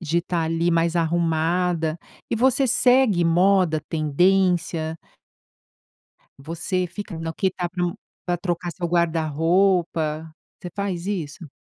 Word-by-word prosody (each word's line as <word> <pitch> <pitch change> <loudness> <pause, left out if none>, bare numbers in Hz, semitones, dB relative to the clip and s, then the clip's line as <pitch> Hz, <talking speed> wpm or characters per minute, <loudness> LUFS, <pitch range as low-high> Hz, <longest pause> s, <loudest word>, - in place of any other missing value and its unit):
de 170 0 0
estar 170 -1 -2
ali 165 +2 0
mais 165 0 +1
arrumada. 165 0 0 0.3
E - - 0
você 260 +3 +3
segue 245 -7 +4
moda, 175 -1 +3
tendência? 165 0 +1 1.4
Você 175 +4 -2
fica 200 -2 -7
no 165 0 -4
que 190 - 0
está 180 -1 -3
pro 175 -1 -2 0.3
pra 175 -1 0
trocar 175 0 -3
seu 175 0 -4
guarda-roupa? 165 -1 +1 0.3
Você 180 - -6
faz 190 -4 -3
isso? 165 -5 -5
170 Hz, 120 wpm, -23 LUFS, 160-185 Hz, 1.4 s, segue